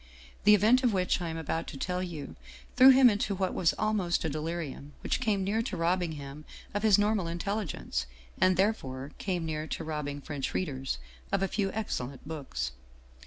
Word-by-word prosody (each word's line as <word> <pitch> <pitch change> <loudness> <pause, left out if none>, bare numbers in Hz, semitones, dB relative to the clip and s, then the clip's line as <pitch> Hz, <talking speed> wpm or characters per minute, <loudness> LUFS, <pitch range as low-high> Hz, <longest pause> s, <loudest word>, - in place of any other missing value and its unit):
The 210 0 +9
event 225 +6 +4
of 240 -4 +3
which 185 -1 +1
I 170 - -2
am 160 - -4
about 160 +1 -2
to 140 - -7
tell 180 +5 -2
you 170 -6 -6 0.4
threw 260 +1 +9
him 260 -1 +8
into 205 -2 +1
what 190 -1 -1
was 165 - +2
almost 205 -6 +1
a - - +1
de 155 +1 -3
lirium, 155 -3 -5
which - - 0
came 215 -6 +1
near 210 +4 +1
to 230 - -4
robbing 170 0 +1
him 140 0 -8 0.3
of 205 - -1
his 215 -3 +6
normal 205 -3 +2
in 170 +1 -3
telligence, 175 - -2 0.3
and 185 0 +4
therefore 140 -10 0
came 180 -4 -1
near 155 -1 -3
to - - -4
robbing 150 -2 -3
French 145 -1 -4
read 185 - 0
ers 135 -1 -3 0.3
of 195 -1 +1
a - - +2
few 195 -1 -1
excellent 140 - -4
books. 130 - -4
175 Hz, 200 wpm, -30 LUFS, 150-205 Hz, 0.4 s, The